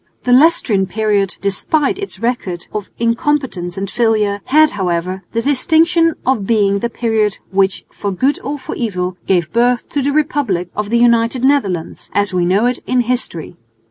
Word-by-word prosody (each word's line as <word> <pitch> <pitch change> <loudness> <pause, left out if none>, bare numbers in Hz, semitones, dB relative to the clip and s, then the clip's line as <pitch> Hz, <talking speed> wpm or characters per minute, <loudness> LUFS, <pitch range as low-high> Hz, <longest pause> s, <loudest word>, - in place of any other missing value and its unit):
The 250 - 0
Leicestrian 250 - +3
period, 205 -2 0
despite 275 - 0
its 400 - -6
record 200 -6 -3
of 210 -2 -4
incompetence 230 -6 -1
and 195 +1 -3
failure, 210 -2 0
had 310 +2 +4
however 185 -1 -2
the 230 0 -1
distinction 325 +4 +2
of 240 -7 0
being 200 -3 +2
the 235 - -2
period 220 -3 0
which 195 0 +1
for 205 - -4
good 265 +10 0
or 285 +3 -3
for 265 - -7
evil 185 -6 -3
gave 175 -4 +1
birth 240 +1 +2
to 285 - -1
the 280 +2 0
republic 270 - 0
of 210 0 -3
the 235 - +2
United 235 +1 +2
Netherlands, 200 - 0
as 205 -1 +1
we 180 -1 +1
know 200 +6 +2
it 250 +1 0
in 255 -1 +2
history. 235 - -3
225 Hz, 170 wpm, -16 LUFS, 195-260 Hz, -, had